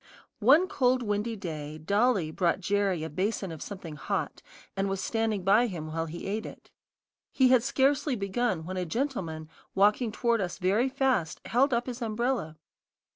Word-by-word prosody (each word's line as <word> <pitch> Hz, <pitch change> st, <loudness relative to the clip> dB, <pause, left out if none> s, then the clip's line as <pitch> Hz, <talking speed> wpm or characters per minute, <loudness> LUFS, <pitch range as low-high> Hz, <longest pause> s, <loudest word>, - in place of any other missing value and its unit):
One 285 Hz, -, +5 dB
cold 255 Hz, -5 st, +2 dB
windy 210 Hz, +2 st, -1 dB
day, 155 Hz, -6 st, -6 dB
Dolly 200 Hz, 0 st, +1 dB
brought 175 Hz, +2 st, +1 dB
Jerry 195 Hz, -3 st, 0 dB
a 160 Hz, -, -4 dB
basin 195 Hz, +2 st, -2 dB
of 160 Hz, -, -8 dB
something 175 Hz, -7 st, -7 dB
hot, -, -, -3 dB, 0.3 s
and 195 Hz, 0 st, 0 dB
was 195 Hz, 0 st, -2 dB
standing 220 Hz, -2 st, -1 dB
by 210 Hz, +6 st, +4 dB
him 170 Hz, -7 st, -5 dB
while 165 Hz, +1 st, -2 dB
he 170 Hz, +2 st, -7 dB
ate 210 Hz, +3 st, -3 dB
it. -, -, -13 dB, 0.6 s
He 260 Hz, -2 st, +4 dB
had 255 Hz, -2 st, +6 dB
scarcely 275 Hz, +1 st, +1 dB
begun, 200 Hz, -4 st, -1 dB
when 185 Hz, +2 st, -5 dB
a 180 Hz, -, -1 dB
gentleman, 170 Hz, -, -3 dB, 0.3 s
walking 210 Hz, +4 st, +3 dB
toward 235 Hz, 0 st, +1 dB
us 180 Hz, -2 st, -3 dB
very 205 Hz, +8 st, +2 dB
fast, 255 Hz, -, 0 dB
held 270 Hz, +4 st, +2 dB
up 240 Hz, 0 st, +1 dB
his 245 Hz, -1 st, -6 dB
umbrella. 230 Hz, -7 st, -1 dB
205 Hz, 170 wpm, -28 LUFS, 180-245 Hz, 0.6 s, had